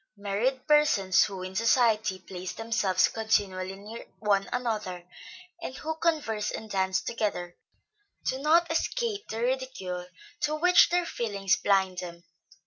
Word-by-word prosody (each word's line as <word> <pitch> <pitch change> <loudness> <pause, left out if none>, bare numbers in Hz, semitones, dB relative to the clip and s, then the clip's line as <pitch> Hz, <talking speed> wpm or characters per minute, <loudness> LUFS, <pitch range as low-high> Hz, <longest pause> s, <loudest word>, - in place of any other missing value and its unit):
Married 215 +6 -1
persons 295 -12 +4
who, 190 -3 -6
in 185 0 -6
society, 220 -3 +3
place 185 0 -7
themselves 225 -5 +1
continually 195 -4 -1
near 210 +4 -10
one 200 -2 +1
another, 210 -8 -3 0.5
and 260 -6 -6
who 320 +1 -3
converse 295 -11 0
and 220 -1 -6
dance 190 +3 +1
together, 205 -7 -3 0.7
do 260 - -1
not 325 +4 +3
escape 430 +4 -1
the 220 - -4
ridicule 245 -9 -3 0.3
to 300 +1 0
which 355 +3 +6
their 355 0 +1
feelings 200 - 0
blind 190 -2 +1
them. 170 -1 -8
215 Hz, 135 wpm, -28 LUFS, 190-260 Hz, 0.7 s, which